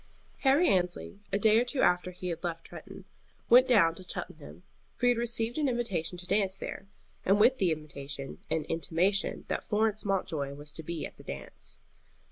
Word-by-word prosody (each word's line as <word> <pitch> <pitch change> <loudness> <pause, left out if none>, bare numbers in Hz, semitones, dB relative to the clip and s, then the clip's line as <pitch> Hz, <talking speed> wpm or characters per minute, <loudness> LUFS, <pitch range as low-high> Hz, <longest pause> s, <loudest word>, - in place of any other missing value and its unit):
Harry 280 +6 +4
Annesley, 180 +1 0
a 195 - +2
day 220 +2 +5
or - - +3
two 255 +2 0
after 180 0 +3
he 180 0 -6
had 165 -1 -4
left 165 -1 -3
Tretton, - - -10 0.5
went 255 +2 +8
down 195 -10 +5
to 185 - -12
Cheltenham; 75 +5 -6 0.3
for - - -1
he - - +6
had 245 -1 +2
received 235 +2 0
an 290 -3 +2
invitation 190 -9 -2
to 180 - -8
a - - -13
dance 195 -1 +1
there, 195 - -6 0.4
and 195 +2 +3
with 245 +5 +5
the 185 -4 +3
invitation 140 -3 -6
an 160 -1 0
intimation 170 +6 0
that - - -2
Florence 215 0 +1
Mountjoy 170 -8 -1
was 145 +1 -4
to 160 - -6
be 165 0 -4
at - - -10
the - - -13
dance. 70 -1 -7
185 Hz, 195 wpm, -30 LUFS, 160-225 Hz, 0.5 s, went